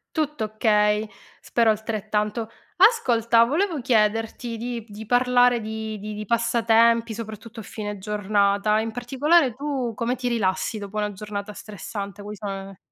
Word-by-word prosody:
Tutto 300 Hz, -6 st, -1 dB
okay, 210 Hz, 0 st, +2 dB, 0.3 s
spero 230 Hz, -2 st, +2 dB
altrettanto. 215 Hz, 0 st, -1 dB, 0.3 s
Ascolta, 235 Hz, -, +4 dB
volevo 325 Hz, +5 st, 0 dB
chiederti 225 Hz, -1 st, 0 dB
di 235 Hz, 0 st, -4 dB
p 215 Hz, -, -19 dB
di 215 Hz, +2 st, -8 dB
parlare 245 Hz, 0 st, +4 dB
di 220 Hz, 0 st, -5 dB
di 210 Hz, +1 st, -6 dB
di 210 Hz, 0 st, -6 dB
passatempi, 230 Hz, 0 st, +3 dB
soprattutto 225 Hz, +1 st, -8 dB
a -, -, -11 dB
fine 205 Hz, 0 st, -6 dB
giornata. 205 Hz, +1 st, +1 dB
In 225 Hz, 0 st, -3 dB
particolare, 265 Hz, +4 st, +2 dB
tu 270 Hz, -3 st, -3 dB
come 235 Hz, +2 st, -1 dB
ti 250 Hz, -, -3 dB
rilassi 215 Hz, -2 st, 0 dB
dopo 200 Hz, +1 st, -7 dB
una 210 Hz, -1 st, -1 dB
giornata 205 Hz, +1 st, -6 dB
stressante? 205 Hz, 0 st, -7 dB
Quali 210 Hz, +1 st, -7 dB
sono 200 Hz, -1 st, -5 dB
ne 195 Hz, -, -6 dB
ne 195 Hz, -1 st, -12 dB
220 Hz, 155 wpm, -24 LUFS, 210-240 Hz, 0.3 s, Ascolta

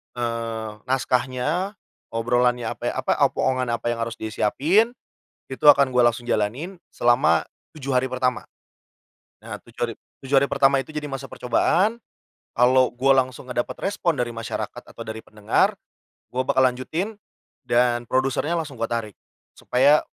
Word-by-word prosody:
eee, 115 Hz, -2 st, -3 dB, 0.2 s
naskahnya, 130 Hz, -, 0 dB, 0.3 s
obrolannya 120 Hz, +1 st, +1 dB
ape -, -, -5 dB
apa -, -, -1 dB
omongan 130 Hz, -1 st, -1 dB
apa 120 Hz, 0 st, -1 dB
yang 115 Hz, -, -3 dB
harus 115 Hz, 0 st, -3 dB
disiapin, 155 Hz, -, +1 dB, 0.5 s
itu 130 Hz, +3 st, -5 dB
akan 140 Hz, -2 st, +7 dB
gue 125 Hz, -1 st, +3 dB
langsung 120 Hz, +1 st, 0 dB
jalanin, 130 Hz, -, -1 dB, 0.2 s
selama 120 Hz, +3 st, +3 dB, 0.3 s
7 140 Hz, -4 st, -1 dB
hari 125 Hz, -, +2 dB
pertama. 125 Hz, -1 st, -1 dB, 1.0 s
Nah 110 Hz, -2 st, -7 dB
tujuh 120 Hz, +1 st, -9 dB
hari -, -, -7 dB, 0.3 s
tujuh 135 Hz, +1 st, +1 dB
hari 140 Hz, -, +2 dB
pertama 135 Hz, 0 st, +3 dB
itu 135 Hz, -, -15 dB
jadi 150 Hz, -1 st, -3 dB
masa 135 Hz, 0 st, -5 dB
percobaan, 190 Hz, -, +1 dB, 0.5 s
kalo 125 Hz, +1 st, +4 dB
gua 135 Hz, +2 st, +3 dB
langsung 130 Hz, 0 st, -11 dB
dapet 125 Hz, +1 st, -2 dB
respon 175 Hz, -6 st, -1 dB
dari 120 Hz, -1 st, 0 dB
masyarakat 115 Hz, 0 st, -5 dB
atau 115 Hz, -, -8 dB
dari 110 Hz, 0 st, -6 dB
pendengar 105 Hz, 0 st, +1 dB, 0.6 s
gue 130 Hz, -, 0 dB
bakal 130 Hz, -, +4 dB
lanjutin 145 Hz, -, -1 dB, 0.6 s
dan 120 Hz, -1 st, +2 dB
produsernya 135 Hz, +6 st, 0 dB
langsung 145 Hz, -7 st, -5 dB
gue 115 Hz, -, 0 dB
tarik, 115 Hz, -4 st, -3 dB, 0.4 s
supaya 140 Hz, +4 st, +3 dB
125 Hz, 145 wpm, -23 LUFS, 120-140 Hz, 1.0 s, akan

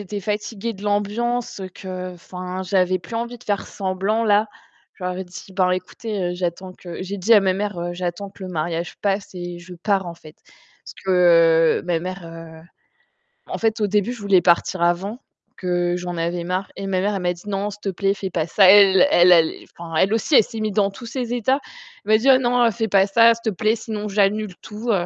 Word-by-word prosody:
j'étais 205 Hz, +1 st, -5 dB
fatiguée 210 Hz, +2 st, -3 dB
de 200 Hz, -1 st, -13 dB
l'ambiance 210 Hz, +3 st, -1 dB, 0.2 s
qu'enfin, 185 Hz, 0 st, -6 dB
j'avais 185 Hz, 0 st, +1 dB
plus 175 Hz, +6 st, -10 dB
envie 235 Hz, +1 st, -4 dB
de -, -, -18 dB
faire 205 Hz, -1 st, -2 dB
semblant, 195 Hz, +3 st, -1 dB
là. 210 Hz, 0 st, +3 dB, 0.5 s
Je 185 Hz, -, -10 dB
leur 180 Hz, 0 st, -2 dB
ai 190 Hz, -, -4 dB
dit: 180 Hz, +2 st, -12 dB
«Bah, 185 Hz, -1 st, +2 dB
écoutez, 185 Hz, 0 st, -4 dB
j'attends 180 Hz, +1 st, -4 dB
que» 175 Hz, -1 st, -8 dB
j'ai 200 Hz, +2 st, -5 dB
dit 215 Hz, +5 st, +4 dB
à 210 Hz, -, +7 dB
ma 190 Hz, -1 st, +2 dB
mère: 185 Hz, -3 st, -3 dB
«J'attends 180 Hz, +2 st, -4 dB
que 195 Hz, -, -14 dB
le 185 Hz, -, -5 dB
mariage 170 Hz, 0 st, -3 dB
passe 200 Hz, -1 st, -1 dB
et 175 Hz, -1 st, -6 dB
je 180 Hz, +1 st, -11 dB
pars, 190 Hz, +1 st, 0 dB
en 170 Hz, -, -6 dB
fait». 155 Hz, -2 st, -15 dB, 0.5 s
Parce -, -, -10 dB
que 165 Hz, -3 st, +4 dB
ma 175 Hz, -2 st, 0 dB
mère, 165 Hz, -3 st, -8 dB, 0.9 s
en -, -, -4 dB
fait, 225 Hz, 0 st, 0 dB
au 210 Hz, -, +2 dB
début, 210 Hz, +3 st, 0 dB
je 240 Hz, -, -11 dB
voulais 200 Hz, -3 st, +4 dB
partir 175 Hz, +1 st, +2 dB
avant 185 Hz, +7 st, 0 dB, 0.4 s
que 175 Hz, -1 st, 0 dB
j'en 180 Hz, 0 st, -5 dB
avais 170 Hz, +1 st, -2 dB
marre 185 Hz, +2 st, -3 dB
et 195 Hz, -, -6 dB
ma 185 Hz, -1 st, 0 dB
mère, 205 Hz, +1 st, 0 dB
elle 195 Hz, -, -3 dB
m'a 175 Hz, 0 st, +1 dB
dit: 175 Hz, -, -15 dB
«Non, 200 Hz, +1 st, -2 dB
s'il 205 Hz, +1 st, -12 dB
te 200 Hz, -, -2 dB
plaît, 195 Hz, +1 st, 0 dB
fais 195 Hz, -1 st, -5 dB
pas 165 Hz, -3 st, -1 dB
ça». 195 Hz, +4 st, +4 dB
Elle 200 Hz, +4 st, +7 dB
elle 175 Hz, +1 st, +6 dB
allait 165 Hz, -2 st, +3 dB
enfin, 165 Hz, -1 st, -7 dB
elle 190 Hz, +6 st, +3 dB
aussi, 230 Hz, +6 st, +1 dB
elle -, -, +8 dB
s'est 225 Hz, -, -8 dB
mise 215 Hz, -1 st, -2 dB
dans 200 Hz, 0 st, +2 dB
tous 235 Hz, +5 st, -11 dB
ses 245 Hz, 0 st, -4 dB
états. 250 Hz, +3 st, +1 dB, 0.5 s
Elle 210 Hz, -, -1 dB
m'a 215 Hz, -, +7 dB
dit: 265 Hz, +4 st, +2 dB
«Oh 260 Hz, -, +7 dB
non, 245 Hz, -2 st, +2 dB
fais 225 Hz, +1 st, -2 dB
pas 195 Hz, -1 st, +3 dB
ça, 230 Hz, +3 st, +6 dB
s'il 230 Hz, -, -11 dB
te -, -, +2 dB
plaît, 215 Hz, +3 st, +1 dB
sinon 215 Hz, -2 st, -5 dB
j'annule 205 Hz, -1 st, +1 dB
tout». 220 Hz, +3 st, -4 dB
195 Hz, 220 wpm, -21 LUFS, 180-210 Hz, 0.9 s, elle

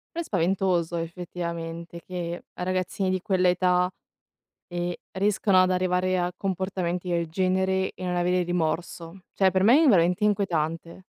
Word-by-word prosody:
Però 340 Hz, -, -1 dB
è -, -, -6 dB
spaventoso 180 Hz, -, 0 dB
effettivamente, 170 Hz, 0 st, -5 dB
che 175 Hz, -1 st, -5 dB
ragazzini 185 Hz, +1 st, -1 dB
di 185 Hz, -1 st, 0 dB
quell'età, 180 Hz, -2 st, +2 dB, 0.8 s
e 175 Hz, 0 st, -2 dB
riescano 195 Hz, -1 st, +3 dB
ad 185 Hz, -, +2 dB
arrivare 185 Hz, 0 st, +1 dB
a 175 Hz, 0 st, -1 dB
comportamenti 185 Hz, -2 st, -2 dB
del 170 Hz, -2 st, 0 dB
genere, 190 Hz, +2 st, 0 dB
e 185 Hz, -, -8 dB
non 180 Hz, -1 st, -1 dB
avere 180 Hz, +1 st, +2 dB
rimorso. 170 Hz, +1 st, -3 dB
Cioè, 190 Hz, -1 st, +3 dB
per 185 Hz, 0 st, +2 dB
me 265 Hz, +10 st, +6 dB
è -, -, +5 dB
veramente 180 Hz, -2 st, +3 dB
inquietante. 170 Hz, -4 st, -1 dB
180 Hz, 140 wpm, -26 LUFS, 170-190 Hz, 0.8 s, me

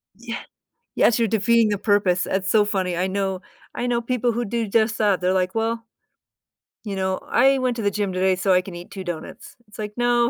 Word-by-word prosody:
Yeah, 235 Hz, +2 st, -6 dB, 0.6 s
yes, 235 Hz, -, +3 dB
you're 230 Hz, -2 st, +2 dB
defeating 225 Hz, +1 st, +3 dB
the 205 Hz, -2 st, -1 dB
purpose. 200 Hz, -4 st, +2 dB
It's 195 Hz, +1 st, -1 dB
so 210 Hz, -1 st, +5 dB
funny. 190 Hz, -4 st, -1 dB
I 180 Hz, -, 0 dB
know 190 Hz, -1 st, -2 dB, 0.3 s
I 245 Hz, -, -2 dB
know 240 Hz, -1 st, +1 dB
people 240 Hz, 0 st, 0 dB
who 240 Hz, +2 st, -2 dB
do 230 Hz, +1 st, -2 dB
just 220 Hz, +1 st, +2 dB
that. 205 Hz, -4 st, +2 dB
They're, 180 Hz, +1 st, +1 dB
like, 185 Hz, -1 st, 0 dB
"Well 225 Hz, +1 st, -1 dB, 1.0 s
"you 200 Hz, -, -4 dB
know, 190 Hz, 0 st, -1 dB
I 270 Hz, 0 st, +4 dB
went 255 Hz, -2 st, 0 dB
to -, -, -2 dB
the 205 Hz, -1 st, +1 dB
gym 200 Hz, -2 st, -2 dB
today, 185 Hz, 0 st, +2 dB
so 185 Hz, +1 st, +2 dB
I 180 Hz, -, +4 dB
can 185 Hz, -1 st, -9 dB
eat 175 Hz, +1 st, -10 dB
2 190 Hz, -1 st, -6 dB
donuts." 170 Hz, -3 st, -7 dB
It's, 210 Hz, -, -15 dB
like, 210 Hz, -1 st, -4 dB
"No, 240 Hz, 0 st, +3 dB
205 Hz, 220 wpm, -23 LUFS, 190-230 Hz, 1.0 s, so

